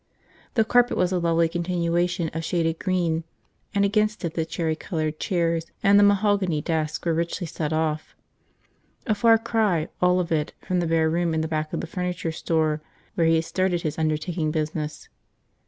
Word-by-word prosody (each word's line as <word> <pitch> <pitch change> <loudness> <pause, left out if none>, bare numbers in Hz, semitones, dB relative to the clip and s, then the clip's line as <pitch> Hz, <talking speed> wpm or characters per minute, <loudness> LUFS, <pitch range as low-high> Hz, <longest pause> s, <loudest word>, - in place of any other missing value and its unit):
The 225 -2 +4
carpet 245 +2 +3
was 180 0 +2
a 185 - +1
lovely 170 -1 +2
continuation 175 0 -1
of 165 +1 -3
shaded 165 -1 0
green, 175 -4 0 0.5
and 200 0 +4
against 210 -1 +1
it 165 - -3
the 160 - -1
cherry 160 -1 -1
colored 155 -3 -3
chairs 170 -2 0 0.2
and 200 +1 +6
the - - +6
mahogany 200 -5 +3
desk 155 +1 -2
were 170 - +2
richly 170 +2 -2
set 155 -1 -3
off. 155 -1 -1 0.9
A 220 - +2
far 225 +2 +5
cry, 210 -8 0
all 180 0 +4
of 175 -2 -2
it, 155 -2 0
from 180 -1 -1
the 170 - 0
bare 160 -1 +2
room 170 0 0
in 160 - +1
the 160 - -1
back 155 -1 -2
of - - -2
the - - -4
furniture 180 -1 -3
store 160 -1 0 0.3
where 170 -5 +2
he 165 - +4
had 160 0 +1
started 185 -1 0
his 155 0 -3
undertaking 155 +1 -1
business. 155 0 -3
170 Hz, 185 wpm, -24 LUFS, 160-180 Hz, 0.9 s, and